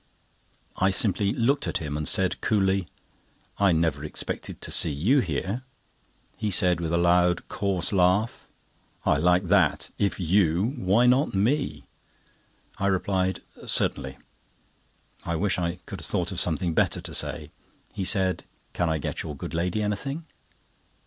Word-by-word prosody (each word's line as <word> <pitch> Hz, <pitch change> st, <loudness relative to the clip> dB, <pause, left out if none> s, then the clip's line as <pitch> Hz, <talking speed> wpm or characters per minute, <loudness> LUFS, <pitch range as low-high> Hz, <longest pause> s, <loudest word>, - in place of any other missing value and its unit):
I 95 Hz, -, +3 dB
simply 100 Hz, +1 st, +1 dB
looked 130 Hz, +4 st, +1 dB
at -, -, -1 dB
him, 75 Hz, -2 st, -5 dB
and 75 Hz, 0 st, -1 dB
said 95 Hz, -1 st, +2 dB
coolly: 95 Hz, -3 st, +1 dB, 0.7 s
"I 100 Hz, -2 st, +4 dB
never 80 Hz, -3 st, +1 dB
expected 75 Hz, -, -4 dB
to -, -, -3 dB
see -, -, +4 dB
you 100 Hz, -, +2 dB
here." 95 Hz, -, -2 dB, 0.7 s
He 110 Hz, -, -2 dB
said, 90 Hz, -2 st, +3 dB
with 80 Hz, -1 st, -2 dB
a 85 Hz, -, +2 dB
loud, 90 Hz, 0 st, +3 dB
coarse 95 Hz, -2 st, -1 dB
laugh: 95 Hz, +4 st, +2 dB, 0.6 s
"I -, -, +3 dB
like 90 Hz, +4 st, +3 dB
that—if 100 Hz, +2 st, +1 dB
you, 90 Hz, -, +2 dB
why 105 Hz, +3 st, +3 dB
not 130 Hz, 0 st, +3 dB
me?" 130 Hz, +9 st, 0 dB, 1.0 s
I 100 Hz, -, +1 dB
replied: 95 Hz, -1 st, 0 dB, 0.3 s
"Certainly," 65 Hz, 0 st, +1 dB, 1.1 s
I 85 Hz, -, -2 dB
wish 95 Hz, +2 st, 0 dB
I 85 Hz, 0 st, -2 dB
could -, -, -7 dB
have -, -, -5 dB
thought -, -, -1 dB
of -, -, -3 dB
something 80 Hz, +2 st, 0 dB
better -, -, +1 dB
to -, -, -8 dB
say. -, -, -3 dB, 0.4 s
He 95 Hz, -, -3 dB
said: 95 Hz, -1 st, +1 dB, 0.3 s
"Can 85 Hz, -2 st, 0 dB
I 80 Hz, -, +1 dB
get 75 Hz, -, -4 dB
your 75 Hz, -, -6 dB
good -, -, -7 dB
lady 90 Hz, +5 st, -1 dB
anything?" 135 Hz, +10 st, -3 dB
95 Hz, 150 wpm, -26 LUFS, 85-105 Hz, 1.1 s, I